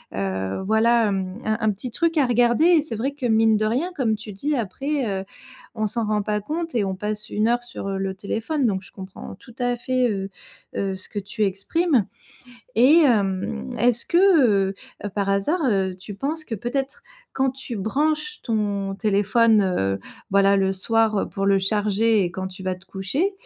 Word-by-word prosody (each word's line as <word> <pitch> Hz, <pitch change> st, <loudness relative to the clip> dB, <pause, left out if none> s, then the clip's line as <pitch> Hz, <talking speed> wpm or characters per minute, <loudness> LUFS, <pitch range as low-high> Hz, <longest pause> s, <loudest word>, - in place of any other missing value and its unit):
heu, 95 Hz, -, -2 dB
voilà, 225 Hz, +2 st, +3 dB
hem, 190 Hz, 0 st, -2 dB
un 215 Hz, 0 st, +1 dB
un 220 Hz, -1 st, +2 dB
petit 210 Hz, +5 st, -6 dB
truc 330 Hz, +5 st, 0 dB
à 285 Hz, -, +4 dB
regarder 240 Hz, +2 st, +3 dB
et 340 Hz, -3 st, +6 dB
c'est 290 Hz, -7 st, -6 dB
vrai 255 Hz, +6 st, -1 dB
que 280 Hz, -2 st, -6 dB
mine 220 Hz, -1 st, +4 dB
de 215 Hz, -, 0 dB
rien 265 Hz, +12 st, 0 dB
comme 230 Hz, -5 st, +1 dB
tu 215 Hz, 0 st, -9 dB
dis: 285 Hz, +10 st, -2 dB
«Après, 270 Hz, +6 st, -2 dB, 0.2 s
heu, -, -, -10 dB, 0.5 s
on 215 Hz, -1 st, -1 dB
s'en 230 Hz, +1 st, -2 dB
rend 210 Hz, 0 st, +1 dB
pas 210 Hz, 0 st, -1 dB
compte 325 Hz, +7 st, -4 dB
et 225 Hz, -, +2 dB
on 190 Hz, -1 st, -2 dB
passe 210 Hz, +2 st, -4 dB
1 215 Hz, +1 st, +1 dB
heure 240 Hz, +1 st, +1 dB
sur 240 Hz, -4 st, -6 dB
le 195 Hz, 0 st, -2 dB
téléphone» 225 Hz, +9 st, -2 dB
donc 195 Hz, -4 st, 0 dB
je -, -, -14 dB
comprends 190 Hz, -1 st, -9 dB
tout 240 Hz, +5 st, -16 dB
à 245 Hz, 0 st, +1 dB
fait, 255 Hz, +1 st, 0 dB
heu 195 Hz, -2 st, -3 dB, 0.5 s
heu, 195 Hz, -1 st, -1 dB
ce 190 Hz, -, -8 dB
que 205 Hz, -, -3 dB
tu 205 Hz, +2 st, -3 dB
exprimes 230 Hz, -, +1 dB, 0.7 s
et 265 Hz, +8 st, +6 dB
hem, 190 Hz, -, 0 dB
est-ce 240 Hz, -1 st, +2 dB
que, 365 Hz, -, 0 dB
heu 235 Hz, -, +4 dB, 0.3 s
heu, -, -, -1 dB
par 200 Hz, -1 st, -1 dB
hasard, 200 Hz, -, +1 dB
heu, 190 Hz, -2 st, 0 dB
tu 200 Hz, +2 st, -8 dB
penses 300 Hz, +10 st, -3 dB
que 235 Hz, -, -4 dB
peut-être 270 Hz, -, -3 dB, 0.3 s
quand 265 Hz, 0 st, +1 dB
tu 260 Hz, -2 st, -7 dB
branches 305 Hz, -, -1 dB
ton 205 Hz, -4 st, -1 dB
téléphone, 210 Hz, +1 st, +3 dB
heu, 95 Hz, -, 0 dB, 0.3 s
voilà 200 Hz, 0 st, +4 dB
le 190 Hz, 0 st, +2 dB
soir, 220 Hz, +3 st, +1 dB
heu, -, -, -1 dB
pour 195 Hz, 0 st, -2 dB
le 195 Hz, 0 st, +4 dB
charger 210 Hz, +1 st, +2 dB
et 175 Hz, -, -2 dB
quand 190 Hz, +2 st, -4 dB
tu 190 Hz, 0 st, -11 dB
vas 185 Hz, 0 st, -1 dB
te 180 Hz, -, -17 dB
coucher 265 Hz, -, -1 dB
215 Hz, 200 wpm, -23 LUFS, 195-250 Hz, 0.7 s, et